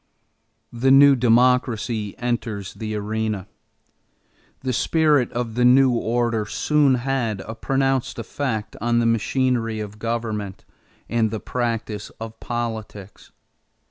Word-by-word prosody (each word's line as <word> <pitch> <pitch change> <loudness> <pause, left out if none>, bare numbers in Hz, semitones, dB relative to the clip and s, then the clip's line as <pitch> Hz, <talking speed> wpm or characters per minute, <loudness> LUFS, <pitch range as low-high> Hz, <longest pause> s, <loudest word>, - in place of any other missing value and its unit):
THE 120 +3 +1
NEW 140 +1 +7
DEMOCRACY 120 -3 +2
ENTERS 115 -5 -3
THE 110 -1 -5
ARENA 105 -1 -2 1.2
The 130 -1 -2
spirit 150 -2 +2
of 120 -2 -3
the 125 +2 +1
new 130 +1 +6
order 115 -2 0
soon 145 +3 +2
had 120 -5 -1
a 110 - -7
pronounced 135 +2 -1
effect 110 -7 -3
on 120 +1 +1
the 120 - +2
machinery 115 0 0
of 105 0 -7
government 110 -4 -4 0.4
and 115 -2 +1
the 110 0 -4
practice 115 -4 -3
of 110 0 -8
politics. 110 -4 -6
115 Hz, 115 wpm, -22 LUFS, 110-125 Hz, 1.2 s, NEW